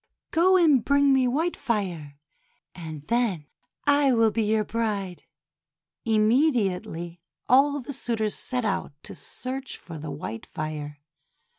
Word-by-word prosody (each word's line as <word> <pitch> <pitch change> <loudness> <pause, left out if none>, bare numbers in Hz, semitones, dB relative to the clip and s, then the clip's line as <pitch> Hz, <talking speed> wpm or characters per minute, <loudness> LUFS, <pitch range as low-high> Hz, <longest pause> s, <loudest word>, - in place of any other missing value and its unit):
Go 370 +3 +4
and 300 -9 +4
bring 280 -1 +4
me 260 -1 +3
white 320 +8 0
fire, 175 - -3 0.6
and 160 -4 -8
then 215 -6 0 0.4
I 285 -1 +4
will 225 -2 +4
be 225 - 0
your 215 0 +1
bride." 205 -5 -3 0.8
Immediately, 215 - +1 0.3
all 280 +3 +4
the 285 +3 -7
suitors 225 -5 -2
set 250 -2 -3
out 205 - -2
to - - -8
search 265 +1 -7
for 165 -3 -10
the 155 +1 -6
white 115 -6 -6
fire. 150 -1 -6
220 Hz, 130 wpm, -26 LUFS, 175-265 Hz, 0.8 s, Go